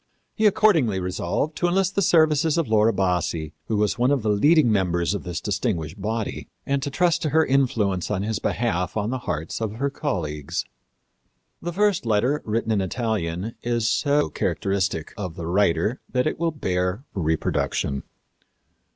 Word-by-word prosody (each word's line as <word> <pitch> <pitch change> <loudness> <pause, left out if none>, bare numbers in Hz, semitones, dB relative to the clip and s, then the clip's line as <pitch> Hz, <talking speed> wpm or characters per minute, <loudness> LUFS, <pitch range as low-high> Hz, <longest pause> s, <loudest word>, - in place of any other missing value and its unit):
He 220 -1 +3
accordingly 160 - +3
resolved 90 - -2
to 175 - +1
enlist 190 +1 +1
the 200 - +1
services 160 -2 +3
of 165 - +1
Laura 110 0 +4
Bassi, 90 -5 -1
who 110 - 0
was 105 +3 0
one 125 +2 +3
of 140 -5 +1
the 105 - +2
leading 145 +4 +4
members 90 -3 +1
of 100 - -3
this 90 -2 -4
distinguished 100 - -2
body, 110 +2 -3 0.2
and 140 0 0
trust 160 +5 +1
to 155 - 0
her 160 +2 +3
influence 115 -9 +1
in 100 -2 -1
his 110 -1 -2
behalf 90 -5 -1
on 105 +2 -1
the 130 - -2
hearts 80 +8 -3
of 110 -2 -2
her 140 +5 -2
colleagues. 80 - -3 1.0
The 175 - -3
first 200 - +1
letter, 120 +7 +2
written 115 +1 -1
in 105 -3 +2
Italian, 100 -1 -2
is 120 -2 0
so 145 +6 +2
characteristic 95 -5 -1
of 90 -6 -5
the 85 - -6
writer 95 +4 +1
that 125 0 +1
it 155 - -1
will 170 0 +1
bear 90 - -2
reproduction. 80 -5 -1
110 Hz, 165 wpm, -24 LUFS, 90-140 Hz, 1.0 s, Laura